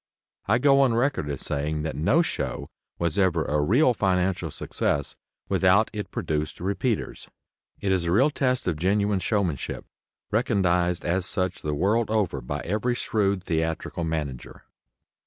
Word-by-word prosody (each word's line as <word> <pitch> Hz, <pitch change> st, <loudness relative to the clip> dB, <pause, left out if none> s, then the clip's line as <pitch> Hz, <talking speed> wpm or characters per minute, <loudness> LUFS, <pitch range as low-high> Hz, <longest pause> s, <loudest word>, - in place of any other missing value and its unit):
I -, -, +4 dB
go 135 Hz, +2 st, +4 dB
on 125 Hz, -4 st, +3 dB
record 120 Hz, -, 0 dB
as 70 Hz, -, -4 dB
saying 75 Hz, +1 st, -2 dB
that 80 Hz, -, -3 dB
no 135 Hz, -, +3 dB
show -, -, -4 dB, 0.3 s
was 85 Hz, +1 st, -1 dB
ever 85 Hz, -4 st, +2 dB
a 75 Hz, 0 st, +1 dB
real 125 Hz, -, +4 dB
financial 90 Hz, -4 st, 0 dB
success 70 Hz, -1 st, -2 dB, 0.3 s
without 95 Hz, +4 st, +3 dB
it 105 Hz, -1 st, -5 dB
produced 75 Hz, -1 st, -3 dB
"repeaters." 100 Hz, +5 st, -2 dB, 0.5 s
It 100 Hz, -, -1 dB
is 95 Hz, -2 st, +1 dB
a 85 Hz, -, 0 dB
real 110 Hz, -, +4 dB
test 130 Hz, -5 st, 0 dB
of 85 Hz, -4 st, 0 dB
genuine 100 Hz, +3 st, +1 dB
showmanship, 95 Hz, -, -2 dB, 0.5 s
recognized 90 Hz, -6 st, +1 dB
as 90 Hz, +1 st, +1 dB
such 95 Hz, -1 st, -1 dB
the 75 Hz, -1 st, -2 dB
world 105 Hz, +8 st, +1 dB
over 100 Hz, -11 st, 0 dB
by 75 Hz, +4 st, -4 dB
every 110 Hz, +7 st, -1 dB
shrewd 100 Hz, -5 st, 0 dB
theatrical 80 Hz, 0 st, -2 dB
manager. 75 Hz, -6 st, -4 dB
95 Hz, 150 wpm, -25 LUFS, 80-110 Hz, 0.5 s, I